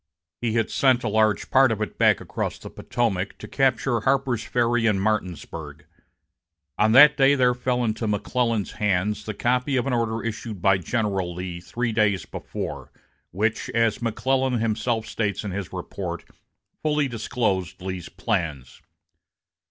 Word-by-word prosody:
He 115 -2 0
had 115 -1 0
sent 130 -2 +3
a - - -1
large 110 -1 +1
part 130 -2 +5
of 110 - -1
it 105 - -4
back - - +5
across - - -4
the - - -10
Potomac 115 -7 -2
to - - -9
capture 130 -2 +1
Harper's 130 -2 +1
Ferry 120 -1 +1
and 105 -3 +2
Martinsburg. 95 -4 -3 0.9
On 110 +1 +4
that 150 +4 +9
day 135 0 +5
there 125 -2 +3
fell 125 0 -1
into 110 0 -1
McClellan's 110 +1 0
hands 105 +1 0
the 110 - -4
copy 125 +4 +1
of 125 - 0
an 135 - -1
order 115 -1 -1
issued 115 -2 -5
by 95 +1 +3
General 95 -2 -1
Lee 90 -1 -5
three 115 +6 -2
days 105 -4 +1
before, - - -6 0.4
which, 110 +5 -1
as 115 -1 +2
McClellan 130 +3 0
himself 115 0 -1
states 105 -3 -2
in 100 - -4
his 95 -1 -5
report, - - -5 0.6
fully 150 -2 +1
disclosed 105 -6 -2
Lee's 90 -2 -5
plans. 85 - -3
110 Hz, 150 wpm, -24 LUFS, 100-125 Hz, 0.9 s, that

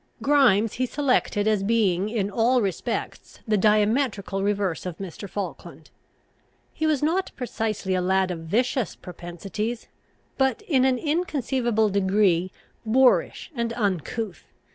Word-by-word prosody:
Grimes 250 -7 +3
he 255 +1 -1
selected 250 -7 +1
as 215 -2 +2
being 200 -3 +1
in 205 -3 -1
all 240 +4 +3
respects 195 -6 -4
the 215 - +2
diametrical 210 0 +1
reverse 200 -3 -1
of 170 -2 -6
Mr. 195 +1 -7
Falkland. 200 -1 -7 0.8
He 315 - -1
was 300 -3 +1
not 355 +5 +1
precisely 220 -6 -2
a 185 - +1
lad 190 0 +1
of 170 - -4
vicious 225 +8 -1
propensities, 190 +6 -6 0.5
but 265 -3 +1
in 265 -5 +2
an 260 -1 +3
inconceivable 260 -8 0
degree 190 -2 +2 0.3
boorish 250 +8 +2
and 235 -3 -2
uncouth. 205 -2 -2
215 Hz, 125 wpm, -25 LUFS, 195-250 Hz, 0.8 s, Grimes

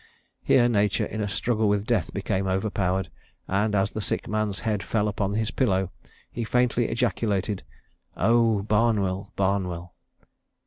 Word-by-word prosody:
Here 120 -2 +4
nature 105 -4 +2
in 110 - -4
a 105 - -1
struggle 110 +1 0
with 100 0 +1
death 110 -7 0
became 95 0 -1
overpowered, 95 -2 0 0.4
and 105 +2 +1
as 100 0 +1
the 110 - -4
sick - - -2
man's 105 -2 -1
head 105 -3 -1
fell 105 0 0
upon 100 -1 -1
his 110 -1 0
pillow, 95 -7 +1 0.4
he 120 - -3
faintly 120 0 +2
ejaculated, 110 -4 0 0.6
'O 115 -1 +3
Barnwell! 105 -3 +1
Barnwell!' 90 -3 -1
105 Hz, 140 wpm, -26 LUFS, 95-110 Hz, 0.6 s, Here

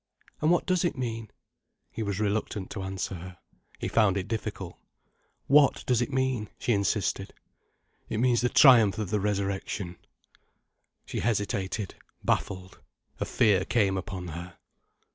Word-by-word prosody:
"And 155 - +3
what 175 - +3
does 185 -1 +1
it 170 -5 0
mean?" 115 -3 -4 0.6
He - - -5
was 100 -2 -2
reluctant 105 -2 -2
to 100 - -4
answer 95 0 -3
her. 90 0 -8 0.4
He - - -3
found 105 -4 +3
it 95 - -3
difficult. 110 0 -5 0.7
"What 140 -1 +4
does 125 -2 +2
it 120 - -1
mean?" 130 -5 0
she 120 - +1
insisted. 100 -1 -1 0.7
"It 110 - -2
means 120 0 +3
the 125 - +2
triumph 115 -10 +7
of 105 -4 -3
the 105 - +2
Resurrection." 100 -2 -2 1.1
She - - -4
hesitated, 100 -3 -1 0.3
baffled, 95 0 -2 0.4
a - - -1
fear 100 -3 +3
came 100 -4 +2
upon 95 -2 -5
her. 85 +2 -8
105 Hz, 145 wpm, -28 LUFS, 95-120 Hz, 1.1 s, triumph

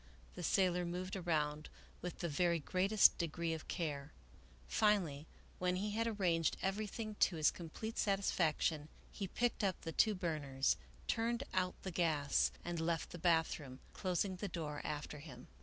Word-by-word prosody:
The 180 - -7
sailor 180 0 +2
moved 180 +2 -3
around 155 -4 -1 0.3
with 180 - -5
the 170 - 0
very 170 +2 +2
greatest 190 +6 +4
de 170 - +1
gree 165 +1 -2
of 160 - -6
care. 150 -4 -3 0.6
Finally, 170 - +2 0.3
when 180 0 +1
he 205 +3 -1
had 225 +2 0
arranged 175 -7 +1
everything 215 +2 -2
to 180 - +4
his 155 -2 +4
complete 200 +7 -6
satisfaction, 165 -6 +1 0.2
he 195 - -4
picked 240 +3 0
up 190 -3 +1
the 165 - -4
two 215 +6 +3
burners, 150 -7 0 0.3
turned 235 +2 0
out 185 -1 +1
the 190 - -3
gas, 155 -5 +2
and 175 -1 -2
left 165 0 -1
the 175 - -7
bathroom, 160 -6 +1
closing 185 +1 -1
the 205 - -3
door 150 -5 -4
after 150 0 -4
him. 140 -5 -10
175 Hz, 155 wpm, -37 LUFS, 155-195 Hz, 0.6 s, greatest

